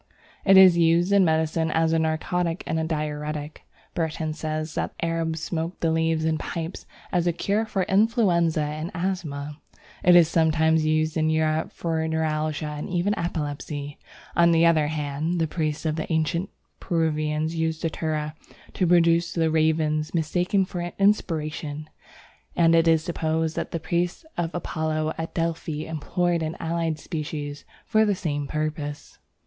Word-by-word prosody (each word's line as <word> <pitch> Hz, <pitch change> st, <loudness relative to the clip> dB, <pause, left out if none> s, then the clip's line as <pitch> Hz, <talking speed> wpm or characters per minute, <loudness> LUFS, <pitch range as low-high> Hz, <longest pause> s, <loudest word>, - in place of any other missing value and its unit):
It 195 Hz, -1 st, +6 dB
is 185 Hz, -2 st, +8 dB
used 170 Hz, +3 st, +3 dB
in 200 Hz, -1 st, +5 dB
medicine 160 Hz, 0 st, +1 dB
as 160 Hz, +1 st, +2 dB
a 165 Hz, -, +3 dB
narcotic 165 Hz, +2 st, -1 dB
and 160 Hz, -, -1 dB
diuretic. 150 Hz, -1 st, -4 dB, 0.3 s
Burton 160 Hz, -1 st, -2 dB
says 155 Hz, 0 st, -4 dB
that -, -, -3 dB
the -, -, -2 dB
Arabs 165 Hz, -1 st, -2 dB
smoke 165 Hz, +1 st, -3 dB
the 165 Hz, -, +1 dB
leaves 160 Hz, 0 st, +1 dB
in 160 Hz, -1 st, +1 dB
pipes 165 Hz, +1 st, -5 dB, 0.2 s
as 175 Hz, -2 st, +1 dB
a -, -, +4 dB
cure 205 Hz, +6 st, -1 dB
for 195 Hz, -3 st, 0 dB
influenza 190 Hz, -7 st, +2 dB
and 155 Hz, +2 st, -4 dB
asthma. 155 Hz, -5 st, -3 dB, 0.4 s
It 180 Hz, 0 st, +7 dB
is 170 Hz, -2 st, +7 dB
sometimes 160 Hz, -1 st, +2 dB
used 155 Hz, +1 st, +1 dB
in 155 Hz, 0 st, +2 dB
Europe 155 Hz, 0 st, +1 dB
for 160 Hz, -1 st, -2 dB
neuralgia 155 Hz, -1 st, -1 dB
and 150 Hz, 0 st, -5 dB
even 180 Hz, +3 st, +1 dB
epilepsy. 145 Hz, -3 st, -4 dB, 0.4 s
On 170 Hz, 0 st, +5 dB
the 165 Hz, 0 st, +4 dB
other 160 Hz, -3 st, +4 dB
hand, 150 Hz, +3 st, -2 dB
the 165 Hz, -, +2 dB
priests 155 Hz, -1 st, -3 dB
of 155 Hz, 0 st, 0 dB
the 160 Hz, -, -4 dB
ancient 160 Hz, +4 st, 0 dB, 0.3 s
Peruvians 155 Hz, -2 st, 0 dB
used 160 Hz, -1 st, -1 dB
Datura 155 Hz, -2 st, -2 dB, 0.4 s
to 185 Hz, -, +1 dB
produce 170 Hz, 0 st, +3 dB
the 165 Hz, -2 st, +1 dB
ravings 155 Hz, 0 st, +1 dB
mistaken 180 Hz, +4 st, +1 dB
for 180 Hz, -1 st, -5 dB, 0.2 s
inspiration, 155 Hz, -6 st, 0 dB, 0.7 s
and 165 Hz, -1 st, +4 dB
it 165 Hz, 0 st, +4 dB
is 160 Hz, -1 st, +4 dB
supposed 160 Hz, -1 st, -1 dB
that -, -, -3 dB
the 165 Hz, -, -3 dB
priests 175 Hz, -, -2 dB
of 170 Hz, -1 st, -1 dB
Apollo 155 Hz, -2 st, -2 dB
at 165 Hz, -, -5 dB
Delphi 165 Hz, -2 st, -2 dB
employed 170 Hz, +2 st, -1 dB
an 160 Hz, 0 st, -3 dB
allied 165 Hz, -1 st, -1 dB
species 150 Hz, -3 st, -5 dB, 0.2 s
for 220 Hz, -1 st, +3 dB
the 205 Hz, -2 st, +2 dB
same 145 Hz, -6 st, -3 dB
purpose. 155 Hz, -1 st, -4 dB
160 Hz, 155 wpm, -25 LUFS, 155-170 Hz, 0.7 s, is